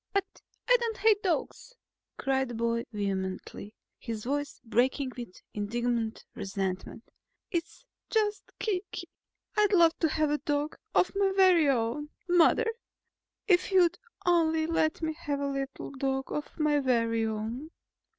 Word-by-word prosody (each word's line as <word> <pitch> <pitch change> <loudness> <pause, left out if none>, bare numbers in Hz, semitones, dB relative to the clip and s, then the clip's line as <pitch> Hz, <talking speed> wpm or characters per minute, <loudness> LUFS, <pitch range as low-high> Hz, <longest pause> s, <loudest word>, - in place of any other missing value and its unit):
"But 395 -1 -2 0.3
I - - +7
don't 465 -2 -2
hate 435 -3 +4
dogs!" 380 +6 -2 0.4
cried 265 -1 +1
the 240 - -6
boy 235 0 0
vehemently, 195 0 -4 0.2
his 225 -3 -5
voice 290 +3 -2
breaking 255 +4 +1
with 235 -7 -9
indignant 230 +2 -2
resentment. 195 +2 -4 0.5
"It's 340 +7 -3 0.2
just 420 -2 0
Kiki. 370 -3 -3 0.5
I'd 420 -1 +3
love 335 -3 +6
to 325 - +2
have 310 0 +1
a 295 0 0
little - - -58 0.2
dog - - -17 0.2
of - - +4
my 395 -1 +3
very 365 -6 +6
own, 260 +4 0 0.2
Mother. 355 +6 +5 0.8
If 365 -3 +4
you'd 355 -1 +4 0.3
only 320 -2 +3
let 320 0 0
me 315 0 0
have 295 -3 -3
a 280 - -1
little 275 -1 -4
dog 270 0 -2
of 295 - -4
my 300 -2 +3
very 230 -4 +1
own!" 220 +7 -4
290 Hz, 140 wpm, -29 LUFS, 235-350 Hz, 0.8 s, I